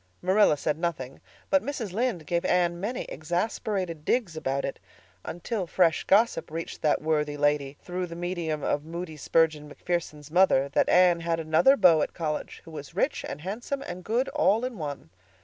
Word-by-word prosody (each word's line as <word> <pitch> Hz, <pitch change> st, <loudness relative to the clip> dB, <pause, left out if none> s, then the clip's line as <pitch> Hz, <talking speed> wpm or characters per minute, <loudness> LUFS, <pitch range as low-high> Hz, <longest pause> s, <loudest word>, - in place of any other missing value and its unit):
Marilla 185 Hz, -4 st, +4 dB
said 150 Hz, +1 st, -1 dB
nothing; 155 Hz, -7 st, -3 dB, 0.3 s
but 190 Hz, -, +5 dB
Mrs. 230 Hz, -6 st, -4 dB
Lynde 220 Hz, -7 st, -1 dB
gave 170 Hz, +3 st, 0 dB
Anne 175 Hz, -1 st, +1 dB
many 235 Hz, +7 st, -3 dB
exasperated 175 Hz, +1 st, -3 dB
digs 200 Hz, -4 st, 0 dB
about 140 Hz, -3 st, -2 dB
it, 135 Hz, -, -5 dB, 0.4 s
until 185 Hz, +2 st, -4 dB
fresh 170 Hz, -2 st, +2 dB
gossip 220 Hz, 0 st, +3 dB
reached 165 Hz, +2 st, -6 dB
that 150 Hz, 0 st, +1 dB
worthy 150 Hz, -2 st, 0 dB
lady, 145 Hz, -1 st, +1 dB
through 180 Hz, 0 st, -3 dB
the 170 Hz, -, -8 dB
medium 170 Hz, -4 st, -3 dB
of 145 Hz, -, 0 dB
Moody 165 Hz, 0 st, -6 dB
Spurgeon 155 Hz, -1 st, +1 dB
MacPherson's 150 Hz, -2 st, -4 dB
mother, 165 Hz, -6 st, +4 dB
that 140 Hz, -, +2 dB
Anne 180 Hz, -1 st, +5 dB
had 165 Hz, 0 st, -1 dB
another 165 Hz, -, +4 dB
"beau" 170 Hz, -6 st, +6 dB
at -, -, -2 dB
college, 155 Hz, -2 st, -4 dB
who 165 Hz, -, -11 dB
was 145 Hz, -3 st, -9 dB
rich -, -, 0 dB
and 145 Hz, -, -6 dB
handsome 240 Hz, -, -4 dB
and 180 Hz, -7 st, -7 dB
good 235 Hz, +6 st, 0 dB
all 220 Hz, +5 st, +2 dB
in 250 Hz, -6 st, -5 dB
one. 145 Hz, -, -6 dB
170 Hz, 175 wpm, -27 LUFS, 150-190 Hz, 0.4 s, beau